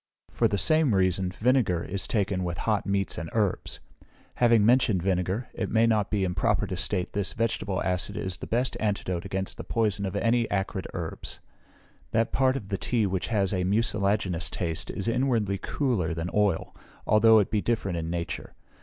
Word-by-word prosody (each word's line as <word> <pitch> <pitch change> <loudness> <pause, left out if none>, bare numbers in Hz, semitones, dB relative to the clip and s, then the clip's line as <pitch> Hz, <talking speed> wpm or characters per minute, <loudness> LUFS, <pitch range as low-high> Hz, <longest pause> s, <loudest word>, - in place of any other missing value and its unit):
For - - +2
the 100 - -1
same 155 - +3
reason 95 -1 +1
vinegar 105 -3 +1
is 100 +1 -2
taken 100 -4 0
with 85 -2 -3
hot 105 -1 0
meats 100 -1 0
and 80 - -5
herbs. 105 -4 0 0.6
Having 115 -3 +4
mentioned 115 -6 +3
vinegar, 95 +4 -1
it - - -3
may 115 0 +3
not 110 -3 +2
be 105 -2 0
improper 90 -2 +1
to - - -4
state 90 - -1
this 100 -1 -1
vegetable 110 -4 -1
acid 90 -1 -1
is 95 -1 -3
the - - -8
best 125 +2 0
antidote 100 -4 -2
against 95 0 -4
the - - -6
poison 105 -4 0
of 95 - -5
any 115 0 +1
acrid 95 -1 -2
herbs. 85 -3 -5 0.7
That 115 +1 +2
part 130 0 +2
of 100 -7 -8
the 100 -2 -2
tea 115 -4 +1
which 95 -2 -2
has 100 -4 +1
a 90 -1 0
mucilaginous 100 -3 +1
taste 80 -3 -3
is 100 - -3
inwardly 115 -5 +1
cooler 105 - -1
than 80 +2 -3
oil, 105 -5 +1 0.3
although 110 +1 +6
it 105 - +2
be 105 -2 +1
different 105 -6 -1
in 80 0 -4
nature. 85 0 -4
100 Hz, 180 wpm, -27 LUFS, 95-115 Hz, 0.7 s, although